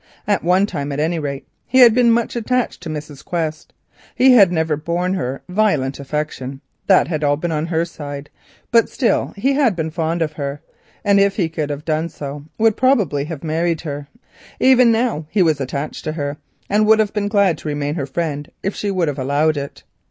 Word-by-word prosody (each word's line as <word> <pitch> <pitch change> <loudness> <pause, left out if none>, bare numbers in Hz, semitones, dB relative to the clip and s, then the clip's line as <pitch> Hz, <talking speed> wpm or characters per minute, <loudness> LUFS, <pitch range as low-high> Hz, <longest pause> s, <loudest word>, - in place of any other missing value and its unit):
At 205 -1 +1
one 180 +3 +3
time, 145 -7 -4
at 140 - -3
any 165 +2 0
rate, 140 -2 -5 0.2
he 260 - +4
had 235 -3 +8
been 240 -1 +4
much 230 +1 0
attached 245 -1 -1
to 170 - -6
Mrs. 150 -2 -7
Quest; 160 -3 -3 0.4
he 260 +1 +6
had 200 -8 +7
never 160 -2 0
borne 170 +4 -2
her 135 -8 -3
any 180 - -10
violent 150 -12 +1
affection; 140 -2 -4 0.3
that 190 - +5
had 155 -3 -2
all 145 0 +2
been 170 +2 -3
on 155 +1 -1
her 165 0 0
side, 145 -3 -8 0.4
but 230 -1 +4
still 250 - 0
he 270 +7 +1
had 270 -8 +2
been 160 -1 -3
fond 165 +1 -1
of 155 -1 -4
her, 140 -1 -4 0.5
and 200 -1 +4
if 200 0 +3
he 185 -5 +1
could 160 -2 -3
have 145 +1 -5
done 160 +1 -1
so, 145 -1 -7
would 225 -1 +3
probably 205 - +2
have 155 -2 -7
married 165 +1 0
her. 145 -3 -6 0.5
Even 255 -2 +5
now 225 -9 0
he 195 0 +3
was 155 -4 +1
attached 140 +3 -4
to 155 - -2
her, 145 -2 -3 0.3
and 210 +1 +2
would 220 0 +6
have 215 -2 +1
been 205 -1 -1
glad 200 -6 +2
to - - -8
remain 145 0 -2
her 145 -4 -3
friend 145 0 -3
if 195 - -1
she 205 - -2
would 185 -4 0
have 145 -2 -3
allowed 145 +4 +1
it. 140 -1 -6
160 Hz, 210 wpm, -19 LUFS, 145-200 Hz, 0.5 s, had